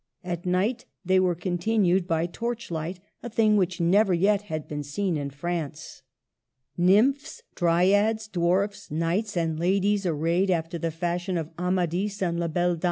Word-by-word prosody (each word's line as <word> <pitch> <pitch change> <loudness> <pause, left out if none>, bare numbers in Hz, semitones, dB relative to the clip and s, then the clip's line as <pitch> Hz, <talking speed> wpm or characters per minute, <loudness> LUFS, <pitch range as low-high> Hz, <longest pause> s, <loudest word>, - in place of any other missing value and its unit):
At 175 0 -4
night 200 +7 0 0.2
they 185 +1 +4
were 180 -2 +2
continued 180 +1 +1
by 165 -1 +1
torchlight, 180 -4 -4
— - - -51
a 240 - -6
thing 215 -1 +3
which 185 -3 +1
never 185 +3 +3
yet 200 +3 +2
had 155 -1 -4
been 150 -1 -4
seen 170 +6 -2
in 145 -2 -3
France. 150 0 -5 0.7
Nymphs, 270 - +2
dryads, 200 +6 +2
dwarfs, 195 +2 0
knights, 175 +6 -1
and 160 -2 -1
ladies 195 +2 +1
ar 165 - 0
rayed 170 +5 +1
after 170 -1 -1
the 165 - -1
fashion 175 +2 -2
of 160 -1 -4
Amadis 180 +2 -1
and 170 -1 -1
La 170 - 0
Belle 175 +1 0
Dam. - - -11
180 Hz, 165 wpm, -26 LUFS, 170-200 Hz, 0.7 s, they